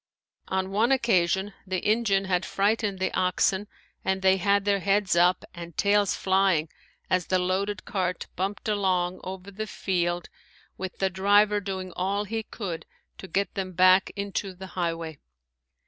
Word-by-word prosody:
On 190 0 -1
one 220 +5 +2
occasion 195 -6 +2
the 185 0 -1
engine 210 -3 +2
had 185 -1 +1
frightened 205 0 0
the 190 - -1
oxen 190 +2 +1 0.4
and 190 0 -1
they 190 0 +5
had 200 +1 +2
their 200 -1 +2
heads 195 -1 +2
up 175 +1 +3
and 170 -2 -9
tails 200 -1 +3
flying 190 -5 +2 0.4
as 185 -2 +1
the 185 - +2
loaded 190 +3 -1
cart 185 -3 -2
bumped 195 +4 -3
along 185 -4 +1
over 190 +1 -7
the 215 +2 -5
field 175 -3 -1 0.5
with 190 -1 -6
the 190 -1 0
driver 205 +2 +4
doing 190 -2 -5
all 195 +3 0
he 225 +2 -3
could 195 -6 -6 0.3
to 190 - -8
get 200 +2 -1
them 190 -2 -4
back 185 +2 +5
into 200 -1 -3
the 190 +1 -9
highway. 165 -3 -3
190 Hz, 155 wpm, -26 LUFS, 185-200 Hz, 0.5 s, they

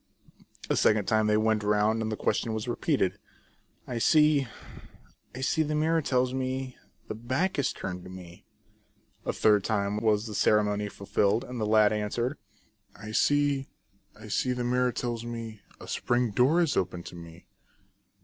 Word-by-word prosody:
A - - +1
second 105 -2 +3
time 110 0 +2
they 105 0 +3
went 110 0 +2
round, 105 +2 +2
and 110 0 -2
the 110 - -3
question 110 -1 -1
was 110 +2 -4
repeated. 120 - 0 0.3
" - - -36 0.3
I 120 -2 -3
see, 150 0 +4 0.9
I 130 - -6
see, 150 +4 +1
the 155 0 -1
mirror 160 +2 +2
tells 130 -2 +1
me, 130 0 -3 0.3
The - - -4
back 130 - -1
is 135 - +1
turned 90 -1 -6
to - - -9
me." 90 -2 -11 0.8
A - - +2
third 105 -2 +3
time 100 -1 -1
was 105 -1 +1
the 110 - -6
ceremony 105 0 +2
fulfilled, 100 +2 0
and 125 -2 -6
the 105 - 0
lad 110 0 +4
answered: 120 +6 -2 0.3
" 105 -2 -46
I 110 +1 -9
see, 145 +2 +2 0.5
I - - -10
see, 125 - 0
the 125 -1 -3
mirror 125 +1 +1
tells 120 -1 -3
me, 115 -3 -7 0.2
A - - -11
spring 120 -1 0
door 135 - +3
is 165 -4 +1
open 90 -1 -1
to - - -10
me." 85 -1 -12
110 Hz, 175 wpm, -28 LUFS, 105-130 Hz, 0.9 s, see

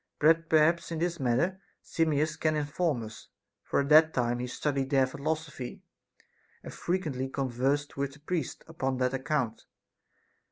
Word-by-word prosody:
But 165 +2 +4
perhaps 160 +2 +3
in 165 - -2
this 170 +1 -1
matter 140 +10 +1 0.2
Simmias 155 -1 +1
can 155 -1 0
inform 150 -3 -1
us, 110 0 -10 0.3
for - - 0
at 140 - -3
that 155 +1 +6
time 120 -1 +1
he 125 - -3
studied 135 +1 -1
their 135 -2 +4
philosophy 145 -1 -4 0.8
and - - -8
frequently 150 -8 -2
conversed 135 +2 -1
with 140 0 -2
the 150 - -16
priests 155 -1 -3
upon 135 -5 -2
that 125 0 +1
account. 135 -4 -1
145 Hz, 150 wpm, -29 LUFS, 130-160 Hz, 0.8 s, that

